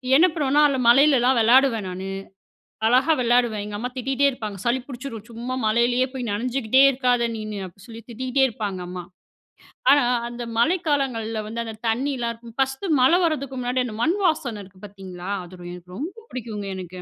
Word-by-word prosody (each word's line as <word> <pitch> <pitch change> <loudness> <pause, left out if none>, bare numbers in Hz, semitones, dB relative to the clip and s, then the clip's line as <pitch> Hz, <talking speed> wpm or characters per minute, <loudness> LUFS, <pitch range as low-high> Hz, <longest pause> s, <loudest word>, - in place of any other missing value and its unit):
என்ன 320 +6 +7
பண்ணுவோன்னா 295 -2 +2
அதுல 270 -2 -1
மழையிலலாம் 260 -1 +5
விளையாடுவேன் 230 -2 +4
நானு. 185 +1 -6 0.8
அழகா 255 +7 +4
விளையாடுவேன். 240 -3 +2
எங்க 210 0 -6
அம்மா 245 +4 -3
திட்டிகிட்டே 270 +2 +1
இருப்பாங்க. 215 -6 -6
"சளி 240 +2 +2
பிடிச்சிடும் 245 -5 -8
சும்மா 240 +3 -5
மழையிலேயே 240 +3 +2
போய் 250 -4 -4
நனைஞ்சுகிட்டே 250 +3 +2
இருக்காத 250 -2 +1
நீனு"அப்படி 200 -4 -7
சொல்லி 230 -1 -10
திட்டிகிட்டே 255 +3 0
இருப்பாங்க 210 -5 -4
அம்மா. 180 0 -6 0.9
ஆனா 285 -1 +5 0.2
அந்த 240 0 -6
மழை 315 +11 +3
காலங்கள்ல 230 -7 -1
வந்து 230 +2 -4
அந்த 225 -1 -7
தண்ணியலாம் 240 +1 -1
இருக்கும், 230 0 -14
ஃபர்ஸ்ட்டு, 270 +7 0
மழை 300 +8 +5
வரதுக்கு 275 -5 -1
முன்னாடி 250 +1 0
அந்த 220 - -6
மண் 335 +10 +2
வாசனை 250 - 0
இருக்கு 190 0 -18
பார்த்தீங்களா! 190 -2 -9
அது 180 0 -13
எனக்கு 180 0 -11
ரொம்ப 385 - -7
பிடிக்குங்க 220 -5 -5
எனக்கு. 185 -1 -8
240 Hz, 160 wpm, -23 LUFS, 215-265 Hz, 0.9 s, என்ன